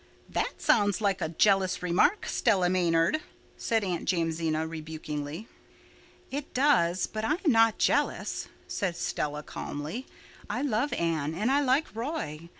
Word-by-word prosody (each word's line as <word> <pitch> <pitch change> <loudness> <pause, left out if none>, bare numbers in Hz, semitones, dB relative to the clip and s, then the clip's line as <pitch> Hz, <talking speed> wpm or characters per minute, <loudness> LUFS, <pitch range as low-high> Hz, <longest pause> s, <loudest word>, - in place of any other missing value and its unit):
"That - - -1
sounds 205 -3 +3
very 210 -2 +2
like 195 - -3
a 160 - -1
jealous 190 +2 +2
remark, 180 - +2
Stella 180 -2 +2
Maynard," 175 - +2 0.3
said 225 -2 0
Aunt 180 -3 -2
Jamesina 165 -2 0
rebukingly. 155 +2 -6 0.8
"It 285 +1 -5
does—but 200 -5 +2
I 290 - +2
am 340 -2 +1
not 225 -1 +4
jealous," - - 0 0.2
said 185 -4 -2
Stella 150 -2 -2
calmly. 155 - -6 0.4
"I 250 - -2
love 265 +1 0
Anne 160 -2 -1
and 215 +8 +1
I 285 +1 +4
like 270 -1 +1
Roy. 225 - -4
185 Hz, 140 wpm, -28 LUFS, 165-235 Hz, 0.8 s, not